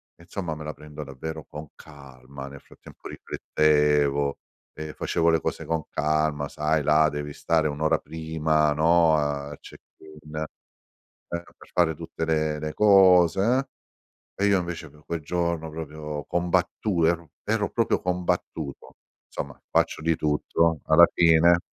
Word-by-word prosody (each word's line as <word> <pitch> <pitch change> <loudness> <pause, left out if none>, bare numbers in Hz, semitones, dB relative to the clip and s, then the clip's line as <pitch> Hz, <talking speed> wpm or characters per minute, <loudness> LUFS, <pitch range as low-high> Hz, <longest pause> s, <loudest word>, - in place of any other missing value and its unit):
e, 85 - -18
insomma, 85 -3 -5
me 75 - -8
la 75 - -4
prendo 75 0 -9
davvero 80 +3 -7
con 75 0 -9
calma. 70 -2 -12
Nel 70 0 -11
frattempo, - - -14
riflettevo 75 -2 +1 0.3
e 75 0 -7
facevo 85 +4 0
le 80 -1 +3
cose - - -3
con 80 -1 -1
calma. 75 -1 0
Sai, 75 0 0
là 75 +1 +4
devi 75 -1 -4
stare 80 0 +1
1 70 0 -6
ora 80 0 +2
prima, 80 -1 0
no, 80 +1 +4
al 75 -1 -2
check-in, 75 0 -14
eh, 75 - -2 0.8
per 85 0 -8
fare 85 -2 +2
tutte 80 - -5
le 80 -1 0
le 75 0 -4
cose, 95 -4 +5
uhm. 125 +7 +2 0.7
E 100 - +2
io, 100 -2 +4
invece, 85 -2 -6
pe' 75 +1 -20
quel 85 -1 -4
giorno, 85 0 -2
proprio, 75 -1 -6
combattu 90 +1 0
ero 85 -1 0 0.2
ero 105 -1 0
proprio 115 -1 0
combattuto. 90 -5 -3 0.3
Somma, 70 -2 -6
faccio - - +1
di 80 0 +1
tutto 80 +1 +1
alla 85 +2 +7
fine 85 +1 +5
80 Hz, 145 wpm, -25 LUFS, 75-85 Hz, 0.8 s, alla